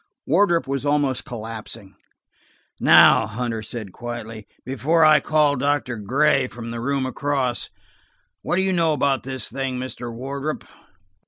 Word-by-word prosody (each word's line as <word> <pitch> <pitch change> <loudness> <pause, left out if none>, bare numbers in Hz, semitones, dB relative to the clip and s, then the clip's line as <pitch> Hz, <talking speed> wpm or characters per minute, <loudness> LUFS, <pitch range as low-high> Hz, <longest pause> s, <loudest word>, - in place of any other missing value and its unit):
Wardrop 170 +1 +2
was 135 0 -3
almost 145 -3 0
collapsing. 115 -5 -8 0.9
"Now," - - +6
Hunter 115 0 -3
said 110 -2 -7
quietly, 115 -2 -7 0.2
"before 145 +6 +2
I 155 -1 +7
call 150 -2 +2
in 135 - -3
Doctor 140 -3 0
Gray 130 +7 +2
from 115 -1 -8
the 115 0 -5
room 135 +1 -1
across, 130 -2 -2 0.7
what - - -1
do 190 - +2
you 190 0 +1
know 165 -3 +2
about 140 -2 +1
this 130 0 -4
thing, 135 -2 -3
Mr. 125 -2 -6
Wardrop 140 +5 -5
130 Hz, 145 wpm, -22 LUFS, 120-145 Hz, 0.9 s, I